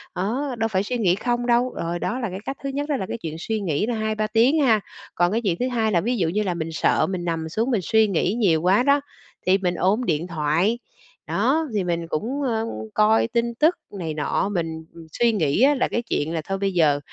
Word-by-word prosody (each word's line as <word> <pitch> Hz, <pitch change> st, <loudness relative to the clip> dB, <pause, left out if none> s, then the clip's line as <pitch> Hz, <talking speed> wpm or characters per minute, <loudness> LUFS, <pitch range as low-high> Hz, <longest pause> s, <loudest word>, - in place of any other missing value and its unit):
đó, 245 Hz, +9 st, -2 dB
đâu 225 Hz, 0 st, +1 dB
phải 190 Hz, -3 st, 0 dB
suy 245 Hz, +4 st, -2 dB
nghĩ 185 Hz, -6 st, +2 dB
không 240 Hz, +3 st, -1 dB
đâu, 245 Hz, +1 st, +2 dB
rồi 170 Hz, +1 st, -2 dB
đó 250 Hz, -, -2 dB
là 235 Hz, -4 st, -2 dB
cái 185 Hz, +1 st, -6 dB
cách 275 Hz, -, -4 dB
thứ 275 Hz, -, -2 dB
nhất 285 Hz, +2 st, -3 dB
đó 290 Hz, -, +1 dB
là 190 Hz, -, -3 dB
cái -, -, -3 dB
chuyện 160 Hz, -1 st, -5 dB
suy 220 Hz, +5 st, -2 dB
nghĩ 170 Hz, -2 st, 0 dB
là 240 Hz, +1 st, -2 dB
2-3 215 Hz, -1 st, -1 dB
tiếng 235 Hz, +8 st, +3 dB
ha. 230 Hz, -6 st, +4 dB, 0.4 s
Còn 175 Hz, +1 st, +2 dB
cái 230 Hz, -, 0 dB
chuyện 180 Hz, -4 st, 0 dB
thứ 250 Hz, -, 0 dB
2 225 Hz, -3 st, 0 dB
là 175 Hz, -4 st, +2 dB
ví 245 Hz, +5 st, -1 dB
dụ 175 Hz, -6 st, +1 dB
như 210 Hz, +5 st, 0 dB
là 180 Hz, -3 st, -1 dB
mình 165 Hz, -1 st, -4 dB
sợ 155 Hz, -1 st, +2 dB
mình 180 Hz, -2 st, -3 dB
nằm 165 Hz, -2 st, -2 dB
xuống 230 Hz, +9 st, -1 dB
mình 210 Hz, -5 st, +1 dB
suy 220 Hz, +4 st, +3 dB
nghĩ 190 Hz, 0 st, 0 dB
nhiều 190 Hz, -9 st, +2 dB
quá 190 Hz, +7 st, +3 dB
đó, 280 Hz, +1 st, +3 dB, 0.4 s
thì 185 Hz, +2 st, +4 dB
mình 180 Hz, -2 st, -1 dB
ôm 205 Hz, +8 st, +1 dB
điện 165 Hz, -1 st, 0 dB
thoại, 170 Hz, +7 st, 0 dB, 0.5 s
đó, 320 Hz, 0 st, +1 dB
thì 200 Hz, -, +1 dB
mình 170 Hz, -1 st, -2 dB
cũng, 235 Hz, -, -2 dB
ơ, 225 Hz, -3 st, 0 dB, 0.3 s
coi 215 Hz, +1 st, +3 dB
tin 235 Hz, 0 st, -1 dB
tức 315 Hz, +8 st, +3 dB, 0.2 s
này 165 Hz, -4 st, -3 dB
nọ. 155 Hz, +6 st, -1 dB
Mình 165 Hz, -3 st, -3 dB, 0.3 s
suy 235 Hz, -1 st, +3 dB
nghĩ 160 Hz, -2 st, +1 dB
á 290 Hz, +2 st, +5 dB
là 260 Hz, -, +1 dB
cái 235 Hz, -, -1 dB
chuyện 160 Hz, -8 st, -2 dB
là 165 Hz, -, -1 dB
thôi 195 Hz, +5 st, -3 dB
bây 195 Hz, 0 st, -1 dB
giờ, 150 Hz, -5 st, +3 dB
210 Hz, 250 wpm, -23 LUFS, 170-235 Hz, 0.5 s, á